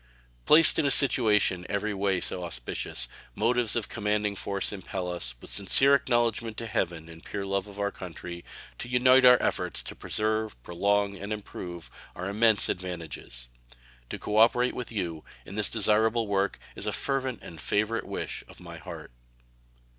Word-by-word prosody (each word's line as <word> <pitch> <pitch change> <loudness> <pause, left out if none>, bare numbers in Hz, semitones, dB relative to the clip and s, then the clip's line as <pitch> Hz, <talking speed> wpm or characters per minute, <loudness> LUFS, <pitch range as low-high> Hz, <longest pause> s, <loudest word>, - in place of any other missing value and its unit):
Placed 160 +1 +8
in 155 - +2
a - - +3
situation 105 -10 +3
every 105 +1 -1
way 95 -2 0
so 90 - -3
auspicious, 60 -4 -3 0.3
motives 115 +1 +1
of 115 -3 -1
commanding 105 -1 -1
force 100 +1 -1
impel 95 -2 -5
us, 60 -8 -3
with - - -13
sincere 135 +8 +6
acknowledgment 120 -4 +1
to 115 - -4
Heaven 85 -7 -2
and 80 0 -13
pure 100 -1 -5
love 100 0 -1
to 100 -1 -11
our 100 0 0
country, 85 -1 -8 0.4
to 120 - -6
unite 130 +1 +5
our 125 0 +9
efforts - - -2
to - - -7
preserve, 110 - -1
prolong, 100 +3 0
and 100 +3 -7
improve 90 -5 -7 0.2
our 90 - -5
immense 110 +1 +3
advantages. 80 -9 -6 0.6
To - - -5
cooperate 115 +4 +3
with 125 - -6
you 85 -7 -4 0.2
in - - -10
this 105 +1 +1
desirable 110 +1 +3
work 100 -1 0 0.2
is - - -6
a - - +1
fervent 130 -3 -2
and 80 -2 -9
favorite 110 +2 -1
wish - - -5
of - - -15
my - - -10
heart. - - -9
105 Hz, 160 wpm, -27 LUFS, 90-115 Hz, 0.6 s, our